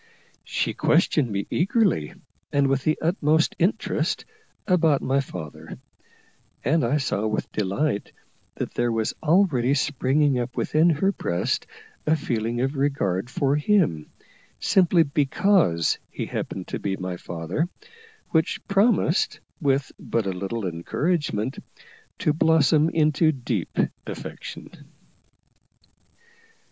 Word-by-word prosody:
She - - -1
questioned 140 -6 +2
me 100 0 -2
eagerly, 190 - +1 0.4
and 140 0 +3
with 135 -1 0
the 155 - +2
utmost 160 -2 +2
interest, 210 +7 0 0.4
about 165 -7 +3
my 135 +1 +2
father; 80 - -8 0.9
and 160 +2 +2
I 125 +6 +2
saw 110 -6 -1
with 110 - -2
delight 105 +4 -1 0.4
that - - -4
there 120 0 0
was 115 -1 -1
already 155 -6 +3
springing 140 0 +1
up 120 +1 -4
within 160 +3 +3
her 170 +5 +2
breast 85 - -2 0.4
a 155 - +4
feeling 120 -4 -2
of 135 +3 -1
regard 125 -8 0
for 140 +2 +1
him, 150 - +1 0.5
simply 180 -3 +4
because 145 - +2
he - - -4
happened - - -5
to - - -3
be 95 -1 -2
my 90 -1 -4
father, 85 - -3 0.6
which 160 0 0
promised, 195 -4 +2 0.2
with 135 -2 +1
but 115 -3 -1
a 95 - 0
little 100 +4 -4
encouragement, 115 - -1 0.6
to 150 - +1
blossom 160 -1 +4
into 155 0 +3
deep 130 -5 -4 0.3
affection. - - -8
140 Hz, 115 wpm, -24 LUFS, 115-160 Hz, 0.9 s, a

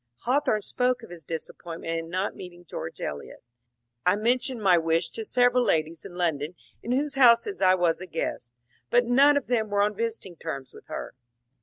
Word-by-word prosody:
Hawthorne 245 -5 +1
spoke 250 +1 0
of 225 - -11
his 175 -2 -9
disappointment 165 +1 -6
in 165 0 -7
not 185 +3 -2
meeting 175 -1 -11
George 85 - -7
Eliot. 70 0 -6 0.3
" 120 0 -54
I 180 - +5
mentioned 245 +3 0
my 185 -2 +6
wish 165 0 +1
to 225 - -4
several 245 +2 +3
ladies 160 -5 0
in 175 - -9
London 165 -2 -1 0.3
in 235 - -4
whose 280 +3 0
houses 270 - +4
I 185 0 +6
was 175 -1 +1
a 185 - -7
guest, 155 -7 -4 0.4
but 245 0 +4
none 280 +4 +5
of 285 - -1
them 225 -3 0
were 205 0 +2
on 210 +1 +1
visiting 220 -5 -4
terms 140 -5 -6
with - - -15
her." - - -6
185 Hz, 190 wpm, -26 LUFS, 165-245 Hz, 0.4 s, my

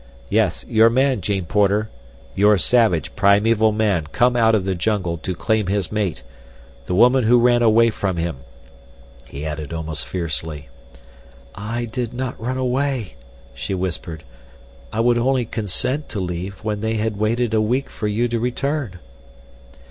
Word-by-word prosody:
"Yes, - - +1
your 115 0 +5
man, 130 -1 +1
Jane 95 -1 -2
Porter. 105 +4 +1 0.4
Your 105 +1 +4
savage, 90 - +2
primeval 105 +2 +3
man 105 -7 0
come 120 +9 +2
out 115 -2 +4
of 100 -4 0
the 95 - 0
jungle 90 -2 -1
to 90 +3 -4
claim 110 +2 0
his 100 0 -1
mate—the 80 - -6
woman 125 +4 +5
who 120 +2 +5
ran 120 0 +4
away 115 0 +4
from 95 -4 -2
him," 85 -3 -2 0.9
he 70 +4 -7
added 75 -1 -5
almost 80 -2 -4
fiercely. 80 -5 -3 0.8
"I 115 +4 -4
did 120 +1 -4
not 125 -2 -4
run 125 +3 -2
away," 130 - -1 0.4
she 95 - -4
whispered. 85 -3 -4 0.7
"I 110 - 0
would 120 0 +3
only 130 0 +1
consent 115 +7 -2
to 105 - -4
leave 90 +2 -5
when 105 -1 -2
they 110 +1 -1
had 110 -1 -2
waited 110 +2 0
a 110 - +3
week 125 +6 0
for 105 - -3
you 110 +4 0
to 120 0 -1
return." 125 -2 -2
105 Hz, 155 wpm, -21 LUFS, 90-120 Hz, 0.9 s, your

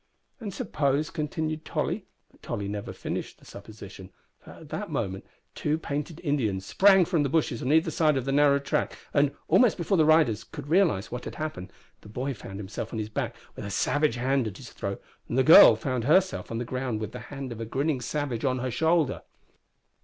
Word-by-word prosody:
"And 215 -4 -5
suppose," 155 - -1
continued 155 0 -3
Tolly - - -3 0.2
but - - -26
Tolly 100 - -4
never 100 0 -5
finished - - -5
the - - -21
supposition, 100 -2 -11 0.3
for - - -17
at - - -13
that - - -4
moment 95 0 -3 0.3
two 150 +1 -1
painted 150 +1 -4
Indians 110 - -1
sprang 190 - +5
from 170 -2 +1
the 140 - 0
bushes 145 -5 0
on 130 - -1
either 160 +2 +3
side 155 -3 +2
of 130 - -2
the 135 - -1
narrow 140 0 +4
track, 140 - -2 0.2
and, 140 -1 +3 0.2
almost 215 +7 +4
before 180 +2 0
the - - +6
riders 150 -9 +4
could 145 -2 -10
realise 165 - +2
what 125 0 -5
had - - -6
happened, 155 -13 -5 0.3
the 105 - -14
boy 130 +6 -3
found 95 -4 -9
himself 100 0 -6
on 115 - -4
his 110 -1 -3
back 110 - -3 0.2
with - - -7
a 100 - -5
savage 145 +7 +1
hand 130 0 0
at 100 -2 -7
his 125 -3 -11
throat 100 0 -5 0.3
and 120 - -2
the 130 - +5
girl 130 -5 +9
found 120 +1 -3
herself 185 +6 +2
on 115 - -3
the 120 - -3
ground 125 -2 -3
with 110 - -5
the - - -7
hand 135 -3 -6
of 115 -1 -6
a - - -3
grinning 135 +3 -1
savage 130 -2 -3
on 130 -2 +1
her 130 0 -3
shoulder. 160 +1 +1
135 Hz, 210 wpm, -27 LUFS, 115-155 Hz, 0.3 s, girl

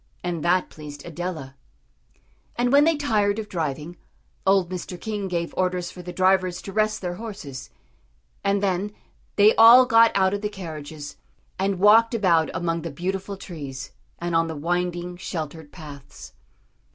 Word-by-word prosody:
And 175 -3 -3
that 180 +1 +2
pleased 145 -2 -10
Adela. 165 -5 -6 1.0
And 245 0 +1
when 285 +2 +6
they 330 0 +3
tired 215 -8 +1
of 220 -1 -4
driving, 160 -1 -4 0.5
old 190 -2 +3
Mr. 180 0 -6
King 210 -3 -4
gave 170 -2 -3
orders 180 -1 -1
for 180 - -10
the 180 0 -7
drivers 185 0 +2
to 195 - -8
rest 215 0 +1
their 175 -1 -4
horses. 150 - -8 0.7
And 200 0 +1
then 195 +2 -1 0.4
they 210 +1 +6
all 235 +3 +9
got 230 -2 +6
out 190 0 +3
of 205 - -2
the 210 - -2
carriages, 155 -6 -8 0.4
and 195 0 0
walked 225 +4 +5
about 170 -7 +3
among 165 -1 -2
the 165 - -5
beautiful 190 +6 -4
trees, 140 -7 -8 0.3
and 175 0 -3
on 165 0 +3
the 160 - -5
winding, 175 +2 -2
sheltered 160 -4 -6
paths. 145 -5 -11
180 Hz, 155 wpm, -24 LUFS, 165-205 Hz, 1.0 s, all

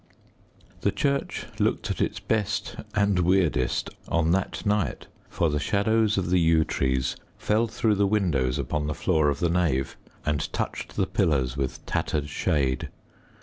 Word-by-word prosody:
The - - +1
church 140 -1 -1
looked - - 0
at - - -3
its - - 0
best 110 -3 -1 0.2
and 100 -2 +3
weirdest 85 -8 +1 0.2
on 80 -1 +1
that 95 +4 -1
night, 105 -1 0 0.2
for 85 - +1
the 75 - 0
shadows 105 +6 +2
of 90 -2 -1
the 90 - +4
yew 80 -1 +4
trees 65 -1 0 0.2
fell 110 +2 +1
through 110 0 +1
the 100 0 +2
windows 80 -12 +1
upon 75 -1 -2
the 75 - -2
floor 75 +1 +2
of 70 0 -1
the 85 - +2
nave 80 -7 +1 0.3
and 75 -1 -1
touched - - -4
the - - +2
pillars 65 -5 +1
with 70 -2 -3
tattered 75 -1 -1
shade. 70 -4 0
85 Hz, 155 wpm, -26 LUFS, 70-100 Hz, 0.3 s, the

